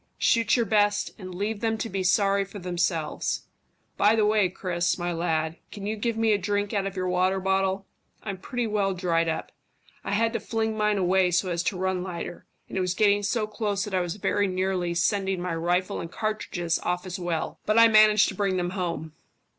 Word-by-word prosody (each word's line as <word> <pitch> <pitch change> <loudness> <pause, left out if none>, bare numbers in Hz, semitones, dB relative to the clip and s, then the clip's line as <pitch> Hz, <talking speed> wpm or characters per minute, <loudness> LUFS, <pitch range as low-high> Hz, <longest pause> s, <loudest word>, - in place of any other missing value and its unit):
Shoot 230 -2 +3
your 235 -2 +2
best, 205 0 +2
and 185 -2 -8
leave 205 +3 -2
them 225 0 0
to 230 - -3
be 195 -3 -3
sorry 195 +2 +3
for 195 +2 -10
themselves. 175 -4 -1 0.5
By 210 +2 +4
the 215 -2 +3
way, 210 -3 +3
Chris, 175 -2 -1
my 175 -1 -2
lad, 165 -1 -1
can 200 -2 -7
you 215 +1 -1
give 225 +1 -2
me 225 -1 +3
a 205 - +1
drink 205 +2 -1
out 195 -2 0
of 195 - -6
your 185 -1 -2
water 185 +1 +1
bottle? 190 0 0 0.4
I'm 195 -3 -5
pretty 245 +5 -3
well 205 -3 0
dried 165 -2 +1
up. 160 - -3 0.5
I - - -3
had 225 +2 +2
to - - -1
fling 220 -1 -2
mine 210 -1 +1
away 185 0 +3
so 180 +1 +1
as 170 0 0
to 190 - -1
run 185 0 -1
lighter, 175 -1 -6 0.2
and 190 - -3
it - - +1
was 180 0 -1
getting 205 0 +3
so 215 +2 0
close 210 -2 -2
that 210 - -7
I 185 - +2
was 175 0 -3
very 205 0 +1
nearly 185 -2 -1
sending 190 +1 +1
my 180 -1 -2
rifle 175 +4 0
and 165 - -7
cartridges 180 -6 -2
off 180 +1 -2
as 185 +1 -5
well. 175 -2 -3
But 215 +1 +2
I 230 0 +9
managed 215 -1 +6
to - - -5
bring 195 -3 0
them 175 0 -1
home. 170 -5 -3
190 Hz, 215 wpm, -26 LUFS, 180-210 Hz, 0.5 s, I